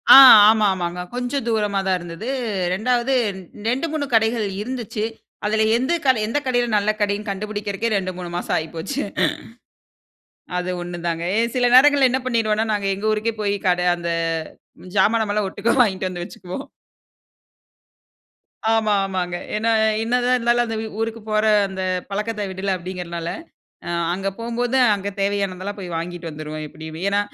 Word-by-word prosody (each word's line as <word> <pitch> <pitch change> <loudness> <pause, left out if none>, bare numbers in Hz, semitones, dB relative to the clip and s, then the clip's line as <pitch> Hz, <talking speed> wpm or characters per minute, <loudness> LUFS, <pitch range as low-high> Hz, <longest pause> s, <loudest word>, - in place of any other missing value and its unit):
ஆ - - +12 0.3
ஆமா, 220 -1 +4
ஆமாங்க. 180 -1 -3
கொஞ்சம் 245 +1 -2
தூரமா 210 -3 +1
தான் 185 - +2
இருந்தது. 175 +6 -8 0.5
2வது 245 +5 +1 0.5
2, 265 +8 0
3 300 -2 -1
கடைகள் 225 -1 +2
இருந்துச்சு. 230 -2 -4 0.4
அதுல 220 +1 +2
எந்த 260 +8 0
கடை 260 -4 +4
எந்த 235 +6 -1
கடையில 245 -2 +1
நல்ல 205 +1 +2
கடைன்னு? 205 +1 0
கண்டுபிடிக்கறக்கே, 205 +2 -3
2, 185 -1 -2
3 180 -1 -6
மாசம் - - -1
ஆயிப்போச்சு. 165 - -4 1.6
அது 180 0 -2
ஒண்ணு 175 0 -6
தாங்க. 165 0 -2
எ - - +4 0.2
சில 245 -1 +3
நேரங்கள்ல 275 0 +7
என்ன 260 - 0
பண்ணிருவோன்னா, 225 -3 +1
நாங்க 200 -2 -1
எங்க 200 +3 -4
ஊருக்கே 215 +1 -1
போயி 205 -1 0
கட 180 0 +2 0.2
அந்த, 170 0 -4 0.9
ஜாமானெல்லாம் 210 0 +2
ஒட்டுக்கா 210 +4 0
வாங்கிட்டு 190 -4 0
வந்து 175 -1 -5
வச்சுக்குவோம். 185 +9 -8 2.1
ஆமா, 220 -1 +2
ஆமாங்க. 180 -2 -2 0.2
என்ன 215 +2 -1 0.4
என்னதான் 245 +2 +2
இருந்தாலும். 240 0 +2
அந்த 225 - -3 0.2
ஊருக்கு 225 0 -3
போற 215 0 +2 0.2
அந்த 190 -1 -6 0.3
பழக்கத்த 210 +1 -2
விடல 190 +1 -2
அப்டிங்கறதுனால, 175 -2 -5 0.6
அ - - -4 0.3
அங்க 195 +1 -2
போகும்போது, 235 +2 -1 0.2
அங்க 200 0 -4
தேவையானதெல்லாம் 200 0 -2
போய் 175 -3 -6
வாங்கிட்டு 175 0 -5
வந்துருவோம், 155 0 -6
எப்படியுமே. 160 +1 -9
ஏன்னா, 200 - +2
210 Hz, 145 wpm, -21 LUFS, 185-230 Hz, 2.1 s, ஆ